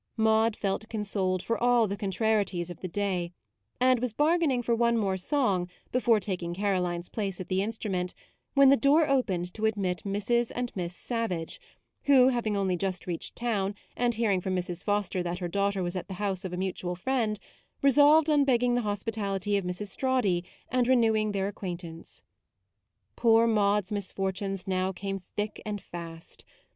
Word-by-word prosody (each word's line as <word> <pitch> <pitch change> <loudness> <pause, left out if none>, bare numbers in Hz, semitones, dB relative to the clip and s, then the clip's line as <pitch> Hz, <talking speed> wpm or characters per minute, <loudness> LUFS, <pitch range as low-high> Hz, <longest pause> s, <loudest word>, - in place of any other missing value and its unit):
Maude 220 0 +3
felt 200 +2 -2
consoled 195 -4 -1
for 230 - -1
all 240 -2 +4
the 200 - -3
con 200 -1 -3
trarieties 195 -3 0
of 175 - -10
the 185 - -4
day; 180 -2 -2 0.5
and 255 -1 +4
was 245 -2 -2
bar 315 +7 +3
gaining 265 -7 +1
for 235 - +1
one 235 0 +2
more 195 -4 +1
song 190 -4 0 0.2
before 240 -3 +3
taking 180 -3 -3
Caroline's 180 -3 -1
place 195 -4 -3
at 185 - -7
the 185 0 +1
instru 215 +1 -3
ment 180 -1 -2 0.4
when 275 -1 +7
the 275 - +7
door 290 +5 +4
opened 190 - 0
to 220 0 0
admit 190 -5 -1
Mrs. 210 +4 0
and 245 0 -2
Miss 180 -2 -4
Savage; 205 -10 -3 0.4
who, 265 -3 +6
having 230 -5 0
only 190 -2 +1
just 185 0 -3
reached 175 -2 -4
town, 205 -4 -1 0.2
and 240 -1 +1
hearing 210 -5 +1
from 185 +1 -2
Mrs. 180 -1 -3
Foster 205 -3 0
that 175 0 -3
her 180 -1 -3
daughter 200 +1 0
was 175 +1 -3
at 180 -2 -4
the 190 - -6
house 195 -1 -2
of 185 - -4
a 180 - -4
mutual 180 -1 -3
friend, 220 +1 0 0.5
resolved 290 +3 +6
on 295 -2 +4
begging 245 -2 +2
the 245 - +2
hospitality 205 -1 -2
of 200 -2 0
Mrs. 180 +3 -3
Strawdy, 215 -8 +1 0.3
and 250 -1 +1
renewing 220 -4 +3
their 195 -1 -1
acquaintance. 175 -4 -7 0.9
Poor 230 -1 +5
Maude's 210 -2 +2
misfortunes 195 -1 -3
now 185 0 0
came 195 +1 -4
thick 205 +3 -5
and 210 -1 -4
fast. 165 -2 -9
205 Hz, 175 wpm, -28 LUFS, 185-235 Hz, 0.9 s, when